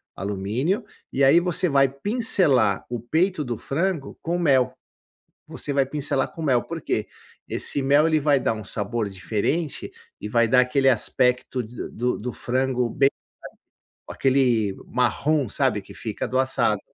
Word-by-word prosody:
alumínio, 105 - -2 0.3
e 140 - +1
aí 150 +6 +7
você 180 0 0
vai 135 -1 +4
pincelar 140 - +1
o 120 -1 -3
peito 160 - 0
do 120 -4 -4
frango 165 0 -2
com 175 +2 -1
mel. 135 -7 +3 0.7
Você 145 - -5
vai 135 -1 +2
pincelar 140 -1 -2
com 165 - -7
mel, 125 -6 +2
por - - -6
quê? - - -2 0.4
Esse 140 - -2
mel 145 +3 +4 0.2
vai 140 -2 +3
dar 115 - 0
um 110 -2 -7
sabor 105 +2 -2
diferente 110 - -2 0.3
e 105 - -5
vai 115 0 +2
dar 125 +2 +5
aquele 135 +2 +2
aspecto 125 +1 +1
de 115 +1 -7
do 125 +2 -1
do 125 +3 -4
frango 125 -1 -1
bem 135 0 +3 1.0
sa - - -5
aquele 125 -7 +2
marrom, 130 +3 +1
sabe, - - 0
que - - -14
fica - - -4
do 130 +3 -1
assado. 130 0 0
130 Hz, 155 wpm, -24 LUFS, 120-145 Hz, 1.0 s, aí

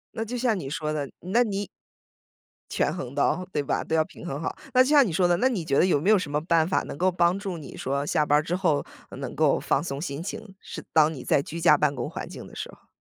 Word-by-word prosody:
那 225 - -2
就 245 +3 -4
像 235 -3 +1
你 140 -7 -5
说 155 0 -2
的， 145 -3 -3
那 210 +7 +2
你 205 -3 -3 1.0
权 - - 0
衡 125 - -6
到 180 +5 +1
对 145 - 0
吧？ - - -1
都 160 - -1
要 160 - +4
平 165 - -13
衡 140 -2 -4
好。 - - -3 0.2
那 255 0 +7
就 260 - -2
像 290 -3 +6
你 190 - -2
说 175 +2 +2
的， 175 0 +3
那 255 - +3
你 205 -9 -2
觉 140 -2 +1
得 - - +5
有 170 -6 +3
没 185 +8 0
有 215 - +7
什 155 -6 -4
么 150 - +1
办 165 -1 +2
法， 185 - +1
能 - - -7
够 185 +2 +2
帮 175 +1 +2
助 195 -3 -5
你 150 -4 -10
说 140 +2 -2
下 150 0 +1
班 145 0 +4
儿 - - +1
之 170 +3 -1
后， 175 -6 +1 0.2
呃， - - -10
能 - - -6
够 - - +3
放 140 - 0
松 140 -4 -4
心 145 -2 -4
情， 195 +1 -7
是 - - -8
当 155 0 +5
你 130 - -8
在 140 - +2
居 165 +4 -7
家 150 -3 +6
办 145 -1 +1
公 - - -3
环 - - -6
境 - - -9
的 - - -14
时 - - -5
候？ - - -21
165 Hz, 305 characters per minute, -26 LUFS, 145-190 Hz, 1.0 s, 那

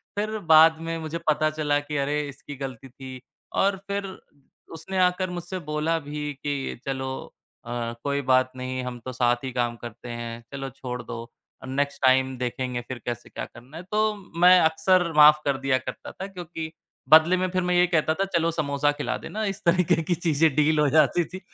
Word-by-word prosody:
फिर 215 +1 -2 0.2
बाद 160 +1 +8
में 165 - -2
मुझे 160 +1 -4
पता 155 0 +3
चला 150 -2 0
कि 145 0 -5
अरे, 145 +2 0
इसकी 140 +1 -10
गलती 135 -1 -7
थी 130 0 -10 0.4
और 195 0 +2
फिर 200 0 -2 0.7
उसने 165 +4 -6
आकर 180 +1 +1
मुझसे 180 +1 -5
बोला 155 +2 +1
भी 150 0 -4
कि, 140 -3 -4
"चलो 130 -1 -3 0.5
अ, 120 - -7 0.3
कोई 140 0 0
बात 130 0 +4
नहीं, 130 0 -4
हम 125 -1 -5
तो 130 +2 -7
साथ 120 0 +1
ही 130 - -3
काम 120 -1 0
करते 120 +1 -9
हैं, 120 0 -6
चलो 135 -1 -5
छोड़ 125 -1 -6
दो 115 -1 -6 0.4
अ, - - -7
नेक्स्ट 140 +2 -2
टाइम 130 0 +3
देखेंगे 125 0 -3
फिर 130 -2 -6
कैसे 120 -1 -5
क्या - - -5
करना 125 +7 -13
है?" 175 - -7
तो, 215 +2 0 0.2
मैं 180 +1 +8
अक्सर 165 +2 +3
माफ 150 0 +8
कर 140 -1 +1
दिया 135 -1 +1
करता - - -7
था 190 - -7
क्योंकि 170 -4 -7 0.4
बदले 160 +4 +7
में 185 - 0
फिर 185 0 0
मैं 180 0 +1
ये 175 0 +5
कहता 160 -2 +2
था 195 +5 -1
चलो 165 0 +2
समोसा 145 -2 0
खिला 145 0 -3
देना, 215 +1 -5
इस 195 0 -4
तरीके 170 -1 +3
की 175 +2 0
चीज़ें 160 -2 +2
डील 155 +1 +3
हो 150 - +4
जाती 160 +4 +4
थी, 185 +4 -9
150 Hz, 200 wpm, -25 LUFS, 130-170 Hz, 0.7 s, बाद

